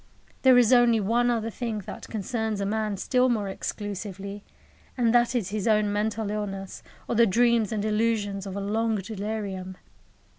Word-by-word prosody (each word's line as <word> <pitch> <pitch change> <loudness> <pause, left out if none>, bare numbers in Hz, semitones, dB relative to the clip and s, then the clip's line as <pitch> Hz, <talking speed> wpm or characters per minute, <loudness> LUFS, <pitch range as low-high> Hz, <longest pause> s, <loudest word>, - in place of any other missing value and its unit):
There 260 -2 +6
is 245 0 +5
only 240 -2 +5
one 235 +4 +2
other 225 -1 -1
thing 230 -1 -3
that - - -8
concerns 220 0 -2
a 200 - -1
man 215 0 -1
still 255 +5 +2
more 215 -4 0
exclusively, 200 0 -5 0.5
and 235 -2 +2
that 240 +1 +3
is 215 -7 0
his 210 0 -2
own 210 -2 +3
mental 210 0 -1
illness, 195 -2 -5 0.3
or - - -1
the 235 0 +5
dreams 235 +1 +3
and 215 -1 -1
illusions 210 -2 0
of 190 - -6
a 200 - -3
long 220 +2 0
delirium. 200 -2 -4
215 Hz, 170 wpm, -26 LUFS, 200-230 Hz, 0.5 s, There